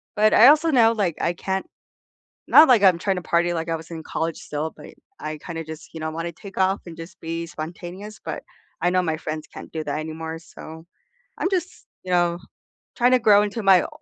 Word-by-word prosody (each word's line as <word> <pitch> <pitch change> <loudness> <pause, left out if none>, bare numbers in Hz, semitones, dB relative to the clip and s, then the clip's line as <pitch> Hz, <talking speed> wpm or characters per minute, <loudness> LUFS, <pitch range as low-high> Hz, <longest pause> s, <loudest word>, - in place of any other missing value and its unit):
but 215 +1 +4
I 235 - +8
also 310 +2 +5
know, 230 -4 +5
like, 195 -7 -1
I 170 - +1
can't 190 +2 -3 0.8
not 310 +2 +8
like 235 -6 +5
I'm 180 -3 +5
trying 195 +1 0
to - - -3
party, 175 +1 +1
like, 165 0 -3
I 165 - 0
was 165 +1 -10
in 160 -1 -7
college 165 0 -3
still, 150 +2 -4
but - - -12 0.3
I 155 0 -5
kinda 165 -2 -6
just, 160 +1 -10
you 160 - -7
know, 160 0 -3
want 165 +1 -4
to - - -5
take 200 +3 -12
off 190 +1 +2
and 165 -2 -9
just 165 +1 -10
be 165 +1 -4
spontaneous, 175 +7 -8
but - - -5 0.4
I 175 - +3
know 185 0 +3
my 160 -2 -1
friends 155 0 -5
can't - - -11
do 160 -1 -4
that 145 0 -3
anymore, 160 +1 -5
so 160 0 -12 0.5
I'm 370 - 0
just, 370 -1 -3 0.2
you 185 - -6
know, 175 -1 +2 0.6
trying 245 +1 +3
to 255 - +6
grow 205 -2 +6
into 210 +2 -3
my 190 -2 +6
o - - -6
175 Hz, 225 wpm, -23 LUFS, 160-205 Hz, 0.8 s, I